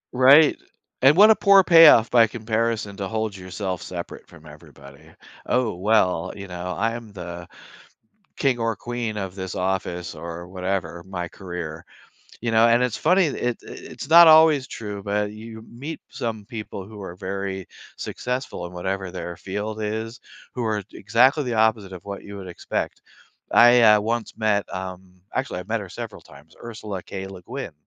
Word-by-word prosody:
Right, 140 +4 +7 0.5
and 135 +3 +6
what 210 +3 +8
a - - +6
poor 200 -2 +6
payoff 165 -10 +7
by 115 -2 +6
comparison 110 -2 -2
to 100 -2 -3
hold 110 -1 -3
yourself 95 -1 -5
separate 85 -1 -8
from - - -17
everybody. 70 +3 -15 0.4
"Oh, 125 -3 +1
well, 90 -2 +1
you 100 -1 -8
know, 90 0 -5
I 115 +1 +1
am 115 -2 -8
the 85 -2 -8 0.9
king 130 -4 +1
or 115 -1 -1
queen 120 0 -4
of 95 -3 -5
this 95 -2 -6
office 90 -2 -2
or, 85 +2 -7
whatever, 90 -1 -4
my 90 -1 -5
career." 85 -3 -7 0.6
You 120 - -1
know, 115 +1 +5
and 120 +1 +4
it's 125 -3 -1
funny, 180 +4 +3
it 120 -4 -2
i - - -10
it's - - -9
not 170 +1 +10
always 155 -4 +6
true, 105 -6 -7
but 105 +1 -1
you 110 +1 -10
meet 140 +8 -8
some 110 -3 -4
people 105 -3 -7
who 105 0 -11
are 90 -3 -8
very 95 0 -5 0.3
successful 125 -7 -4
in 85 - -11
whatever 95 +1 -3
their 90 -1 -6
field 105 +4 -5
is, 110 +3 -4 0.3
who 125 - -3
are 110 -2 -1
exactly 130 +6 +3
the 125 -3 -3
opposite 110 -3 +1
of 90 - -11
what 100 -1 -7
you 100 0 -10
would 95 -2 -8
expect. 90 - -4 0.5
I, 120 +1 +7
uh, 105 -2 +6
once 115 +1 -3
met, 105 -2 +1
um 95 -1 -8
actually, 130 -7 -2
I've 90 - -12
met 115 0 -1
her 100 - -8
several 110 +3 -8
times, 75 0 -18
Ursula 110 -5 -7
K. 95 -1 -7
Le 95 -1 -10
Guin, 130 - -7
105 Hz, 175 wpm, -23 LUFS, 95-120 Hz, 0.9 s, not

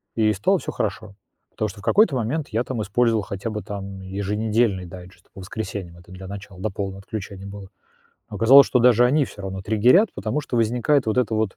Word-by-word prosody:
и 110 -1 +2
стало 115 - +2
всё - - -5
хорошо, 105 0 -4 0.4
потому 110 - -2
что 100 +1 -11
в - - -20
какой-то 205 - +4
момент 130 +6 -2
я 115 +2 0
там 125 -4 -4
использовал 115 +2 +1
хотя 100 +3 -5
бы 105 0 -4
там 100 -2 -7
еженедельный 100 +1 -1
дайджест 90 +1 -13
по 95 - -10
воскресеньям, 95 -3 -6
это 90 +1 -17
для 95 0 -9
начала, 100 -1 -9
до 105 +1 -2
полного 95 -1 -5
отключения 100 -1 -7
было, 100 -1 -9 0.6
но - - -10
оказалось, 135 +4 +7
что 125 - +2
даже 120 0 +5
они 140 +4 +3
всё 100 - -11
равно 95 0 -5
триггерят, 120 - +4
потому 150 - -2
что 130 -4 -4
возникает 120 +4 +2
вот 110 - 0
это 120 -3 +1
вот, 110 -2 -1
105 Hz, 210 wpm, -23 LUFS, 95-120 Hz, 0.6 s, оказалось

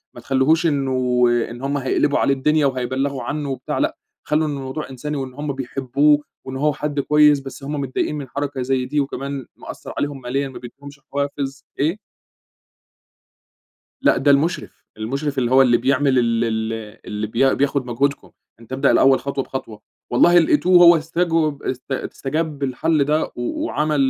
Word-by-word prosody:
ما - - -10
تخلوهوش 145 +6 +2
إنه 130 -4 +1 0.3
إن 120 +2 -9
هم 140 +1 -1
هيقلبوا 140 +2 +1
عليه 140 - +3
الدنيا 150 +3 +2
وهيبلّغوا 130 +1 -1
عنّه 145 0 -3
وبتاع، 135 - -4
لأ - - 0 0.3
خلوا 155 +1 +1
الموضوع 140 +1 -5
إنساني 145 +3 -5
وإن 130 -2 -5
هم 145 +1 -4
بيحبوه 135 +3 +1 0.3
وإن 130 - -6
هو 150 +1 +1
حد 145 0 -3
كويس، 150 0 +4
بس 135 0 -10
هم 145 +1 -3
متضايقين 135 +2 -2
من 140 -2 -6
حركة 140 0 -3
زي 130 0 0
دي 145 +3 -1
وكمان 140 -1 -3
مأثّر - - -9
عليهم 145 -2 -3
ماليًا، 135 +3 -2
ما 130 - -9
بيدّيهمش 140 +3 -12
حوافز 140 -1 -3
إيه؟ 160 +8 +1 2.1
لأ، - - +4
ده 140 +2 +4
المُشرف، 150 +5 -1
المُشرف 135 +6 -3
اللي 120 -1 0
هو 130 +1 +7
اللي 120 -2 +4
بيعمل 130 +1 +2
ال 115 -1 +1
ال 110 -1 -1 0.3
اللي 105 +1 -4
بيا 125 +5 +2
بياخد 140 -1 0
مجهودكم، 140 +4 -1 0.3
أنت 115 +3 -11
ابدأ 130 - +3
الأول 135 0 +5
خطوة 140 -1 -3
بخطوة، 110 -6 -7 0.3
والله 175 +8 +5
لقيتوه 175 +3 +5
هو 170 0 +9
استجوب 160 -2 0
است 130 +2 -5
استجاب 145 +2 -3
للحل 145 +3 +1
ده 150 +3 +1
و 120 0 -3
وعمل 150 +2 0
140 Hz, 165 wpm, -21 LUFS, 130-150 Hz, 2.1 s, هو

